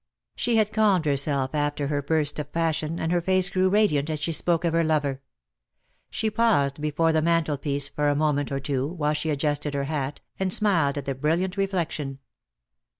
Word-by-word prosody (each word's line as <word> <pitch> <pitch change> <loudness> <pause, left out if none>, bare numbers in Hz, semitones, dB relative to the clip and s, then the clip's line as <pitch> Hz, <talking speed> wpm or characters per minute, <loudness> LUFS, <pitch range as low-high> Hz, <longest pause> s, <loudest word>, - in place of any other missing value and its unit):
She 240 - 0
had 215 -1 +2
calmed 205 -6 +3
herself 140 -1 0
after 145 -1 -1
her 145 0 -1
burst 150 0 0
of 145 -1 -6
passion, 165 -1 -1
and 160 - -1
her 175 -1 +2
face 185 +1 +2
grew 185 0 +2
radiant 185 -8 +2
as 155 -1 -2
she 160 +3 -2
spoke 170 +2 +1
of 165 - +1
her 165 0 +3
lover. 145 -4 0 0.9
She 220 0 -2
paused 180 -12 +1
before 150 +2 +1
the 160 - +2
mantelpiece 150 -4 0
for 145 +1 -1
a 145 - +1
moment 145 -1 0
or 135 - -1
two, 135 -1 -2
while 150 -2 -1
she 150 +1 -2
adjusted 145 0 -1
her 140 - -1
hat, 145 -1 -3 0.2
and 190 -1 0
smiled 170 -10 +2
at 140 - -4
the 135 - -1
brilliant 165 +7 -1
reflection. 170 -8 -2
155 Hz, 190 wpm, -25 LUFS, 145-175 Hz, 0.9 s, calmed